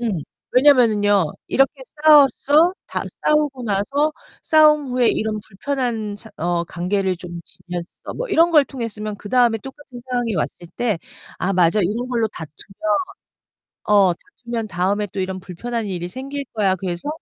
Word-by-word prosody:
응 235 -2 0 0.4
왜냐면은요. 215 - +4 0.2
이렇게 270 0 +2 0.2
싸워서 300 +2 +6
다 - - -3 0.2
싸우고 295 -4 +2
나서 275 +10 0 0.5
싸운 300 -1 +5
후에 250 -2 +2
이런 215 0 -1
불편한 225 -1 -3
사 220 +1 -13
어 175 0 0
관계를 185 +2 -1
좀 175 -1 -8
지났어 175 -1 -8
뭐 - - -4
이런 335 -3 +4
걸 300 -3 +6
통했으면 215 -5 -5
그 205 - -10
다음에 240 -1 +3
똑같은 265 +1 -11
상황이 245 -3 -1
왔을 175 +2 -3
때 225 -7 0 0.4
아 195 - 0
맞아 180 +2 +3
이런 220 +7 -1
걸로 230 -3 0
다투면. 195 - -4 0.9
어, 200 -3 +4
다투면 235 - -6
다음에 195 +3 0
또 195 - -3
이런 190 0 -3
불편한 225 +6 -4
일이 175 -3 -4
생길 275 +7 -6
거야. 200 -4 +2
그래서. 180 +5 -4
220 Hz, 310 characters per minute, -21 LUFS, 190-265 Hz, 0.9 s, 싸워서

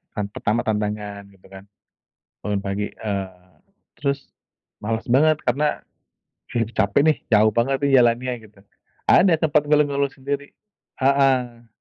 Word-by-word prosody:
hari 105 -2 -3
pertama 115 +3 -1
tantangan 105 -1 -3
gitu 95 -2 -21
kan. 95 0 -11 0.8
Bangun 105 -1 -2
pagi, 100 +1 -2
eee, 95 -4 -6 0.4
terus, 140 -1 -3 0.5
malas 115 +1 -3
banget 155 +5 +4
karena, 140 +5 0 0.7
capek 115 -1 +1
deh, 155 -2 +3
jauh 110 -1 +5
banget 130 +4 +1
nih 140 - +2
jalannya 120 +2 +1 0.2
gitu. 105 - -27 0.5
Ada 185 -2 +6
sempat 150 -1 +2
ngeluh-ngeluh 145 -2 +2
sendiri, 140 +1 -5 0.5
heeh. 130 -4 +2
120 Hz, 120 wpm, -22 LUFS, 105-140 Hz, 0.8 s, Ada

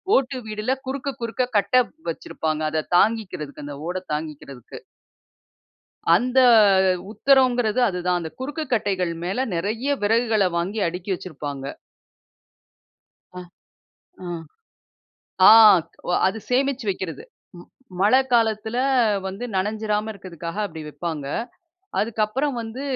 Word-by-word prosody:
ஓட்டு 265 0 +1
வீடுல 215 +3 -2 0.2
குறுக்க, 275 +1 -3
குறுக்க 245 +2 -2
கட்டை 250 +5 +4 0.3
வச்சிருப்பாங்க. 155 -1 -3
அதை 155 -1 0 0.2
தாங்கிக்கிறதுக்கு 185 -10 -1
அந்த 145 -1 -7
ஓட 180 +1 -2 0.2
தாங்கிக்கிறதுக்கு. 150 -5 -7 1.4
அந்த 250 +6 +2 0.7
உத்திரங்கிறது 250 -2 +3
அதுதான். 180 -1 -1
அந்த 160 -1 -6
குறுக்குக் 295 +1 -5
கட்டைகள் 190 -6 0
மேல 225 +9 -1
நெறைய 225 +11 -1
விறகுகள 220 -3 +2
வாங்கி 195 +5 -2
அடுக்கி 180 +3 -6
வச்சிருப்பாங்க. 145 -6 -7 1.7
அ. 180 - -7 0.8
அ - - -6 1.2
ஆ, - - +11 0.6
ஒ - - +1 0.2
அது 195 +4 -2
சேமிச்சு 265 -1 0
வக்கிறது. 180 -6 -4 0.3
ம் 175 - -13 0.3
மழ 205 +4 +3 0.2
காலத்தில 225 -1 +1 0.5
வந்து 195 +5 -5
நனஞ்சிராம 210 +2 -1
இருக்கிறதுக்காக 175 -2 -8
அப்பிடி 160 -4 -8
வப்பாங்க. 155 -2 -5 0.7
அதுக்கப்புறம் 230 +6 0
வந்து 230 +4 -6
210 Hz, 105 wpm, -23 LUFS, 175-245 Hz, 1.7 s, ஆ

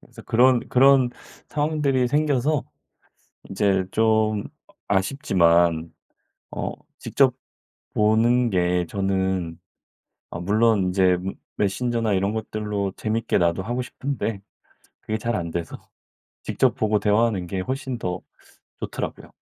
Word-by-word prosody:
그래서 - - -15
그런, 125 +1 +4
그런 130 -1 +5 0.4
상황들이 145 -4 +1
생겨서 145 0 +1 0.8
인제 95 -1 +1
좀 110 -2 +2 0.4
아 100 - +1
아쉽지만 85 - +2 0.6
어 - - -3 0.3
직접 130 -3 +2 0.6
보는 115 +3 +3
게 90 -2 +1
저는 95 -3 -1 0.7
어 85 - -6
물론 105 +1 +2
인제 90 -1 +3
메 95 +2 -4 0.2
메신저나 115 +2 0
이런 100 +2 +1
것들로 105 -3 -3
재밌게 110 -1 0
나도 85 +1 +1
하고 120 +4 -3
싶은데 125 -6 -4 0.6
그게 110 0 -3
잘 115 +1 -1
안돼서 85 -2 -4 0.7
직접 - - +1
보고 105 -1 +1
대화하는 105 -3 +1
게 95 +1 -3
훨씬 130 +4 -4
더 90 -1 -3 0.6
좋더라고요. - - -6
105 Hz, 240 characters per minute, -23 LUFS, 95-120 Hz, 0.8 s, 그런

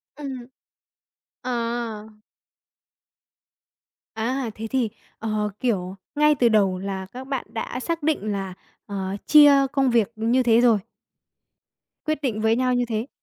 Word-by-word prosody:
ừm. 270 -4 -6 1.0
À! 235 -3 -3 2.1
À, 240 +2 -2
thế 225 - -6
thì, 235 -2 0 0.3
ờ, 215 -1 -1
kiểu, 195 -6 -1 0.2
ngay 300 0 +4
từ 245 -3 +3
đầu 195 -4 +3
là 190 -1 -4
các 260 +1 -8
bạn 270 -2 -3
đã 230 +2 -5
xác 335 +3 -3
định 285 -9 0
là, 195 -2 -4 0.3
ờ, 195 -1 -4
chia 295 -1 +8 0.2
công 270 -2 +2
việc 230 -2 +2
như 235 +4 +2
thế 235 -1 +4
rồi. 235 -4 +5 1.3
Quyết 310 -1 -1
định 225 -6 -1
với 220 +1 +3
nhau 255 0 +1
như 245 0 +1
thế. 225 +2 -3
235 Hz, 135 wpm, -24 LUFS, 215-260 Hz, 2.1 s, chia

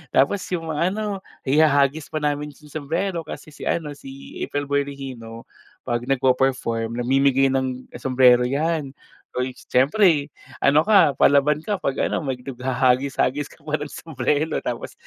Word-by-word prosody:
Tapos, 145 +10 +3
'yong 165 -3 -3
ano, 195 +6 -1 0.2
ihahagis 145 +1 +3
pa 155 -1 -4
namin 145 0 -2
yung 150 -1 -17
sumbrero. 165 +5 -2
Kasi 155 - -8
si - - -8
ano, 160 -3 -1
si 135 -1 -11
April 145 - -2
Boy 140 0 +1
Regino 125 -5 -8 0.4
'pag 120 +1 -2
nagpe-perform, 125 -3 +1
namimigay 135 +1 +3
ng 130 -1 -2
sumbrero, 125 -1 +4
'yan. 145 0 -1 0.4
Uy, 125 +1 -1
siyempre 150 +2 +2 0.3
ano 150 +3 +4
ka, 200 -9 +5
palaban 145 +1 +4
ka 205 -3 -2
'pag 135 - 0
ano, - - -1
mag 135 -4 -3
naghahagis-hagis 130 +2 0
ka - - -20
pa 155 -1 -2
ng - - -5
sumbrero, 150 +1 -2
tapos 120 -1 -5
140 Hz, 145 wpm, -22 LUFS, 130-155 Hz, 0.4 s, ka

